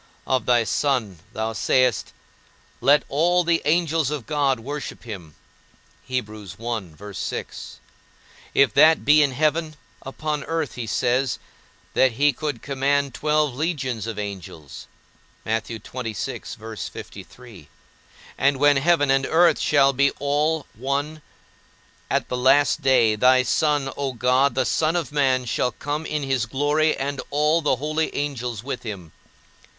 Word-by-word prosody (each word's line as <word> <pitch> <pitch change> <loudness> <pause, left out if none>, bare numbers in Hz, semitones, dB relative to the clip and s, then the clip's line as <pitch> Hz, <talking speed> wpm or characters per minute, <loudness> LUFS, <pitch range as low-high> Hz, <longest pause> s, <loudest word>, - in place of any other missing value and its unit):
Of 130 -1 0
thy 120 -1 +4
Son, 115 - -1
thou 110 +1 -3
sayest, 125 +2 +1 0.7
Let 140 +4 +4
all 175 +5 +2
the 170 -1 +1
angels 160 -2 +1
of 150 -6 -4
God 140 -4 +1
worship 140 +4 -6
him; 90 -10 -9 0.7
if 125 -2 -1 2.5
that 155 +3 +6
be 150 +1 +6
in 145 -2 +3
heaven, 155 +3 0 0.3
upon 150 +2 -4
earth 160 -3 -2
he 120 -2 -6
says, 125 +2 0 0.6
that 130 -2 +3
he 145 +4 +3
could 145 -3 -4
command 140 0 0
twelve 150 -2 +1
legions 130 - -2
of 115 -2 -5
angels; 95 -8 -8 0.6
and 110 0 -1 2.9
when 145 0 +4
heaven 145 -1 +3
and 135 0 +2
earth 165 -1 +4
shall 140 -2 +3
be 140 +1 +3
all 150 +2 0
one, 140 +6 -3 0.9
at - - 0
the 125 - -3
last 130 +2 +3
day, 120 -5 +4
thy 130 +3 +4
Son, 145 0 0
O 140 -2 -3
God, 125 +3 +2
the 130 -1 +1
Son 160 +5 +1
of 165 -7 -2
man, 130 -3 +1
shall 125 +1 0
come 150 +2 -4
in 150 -1 -2
his 130 -5 -1
glory, 145 +5 +1
and 140 0 -3
all 150 +3 +2
the 145 -3 +2
holy 155 +4 -2
angels 125 -6 -3
with 130 -1 -5
him. 95 -8 -7
140 Hz, 125 wpm, -23 LUFS, 125-150 Hz, 2.9 s, that